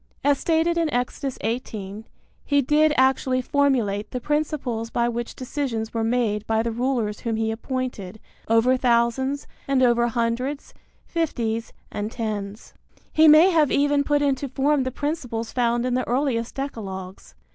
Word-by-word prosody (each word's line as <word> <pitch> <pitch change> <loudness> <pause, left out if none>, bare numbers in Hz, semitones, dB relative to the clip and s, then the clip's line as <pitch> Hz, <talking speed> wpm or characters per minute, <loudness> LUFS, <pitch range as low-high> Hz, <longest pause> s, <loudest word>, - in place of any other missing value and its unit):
As 285 -1 +3
stated 335 +1 +1
in 325 -2 0
Exodus 250 +2 -2
18, 215 -2 -4 0.4
he 285 -1 +2
did 300 +3 +3
actually 260 0 +3
formulate 250 -7 +1
the 250 - -4
principles 275 -5 -2
by 235 0 0
which 240 0 -4
decisions 250 -4 -3
were 225 -1 -1
made 225 -3 0
by 225 0 +1
the 230 - -1
rulers 235 -3 -1
whom 230 -2 -2
he 220 0 0
appointed 225 -4 -4 0.3
over 230 +3 +4
thousands 250 +3 +1 0.2
and 270 -1 +2
over 240 -1 +4
hundreds, 240 +4 -2 0.3
fifties 235 -9 -2 0.2
and 210 +1 -4
tens. 210 -3 -5 0.4
He 315 +1 +6
may 310 +5 +8
have 310 -5 +3
even 285 0 +2
put 290 0 +1
into 275 -1 0
form 275 +1 +1
the 260 - -2
principles 250 -7 -3
found 240 -1 +1
in 250 - 0
the 255 0 -1
earliest 245 -2 -1
decalogues. 190 - -6
245 Hz, 150 wpm, -24 LUFS, 225-280 Hz, 0.4 s, may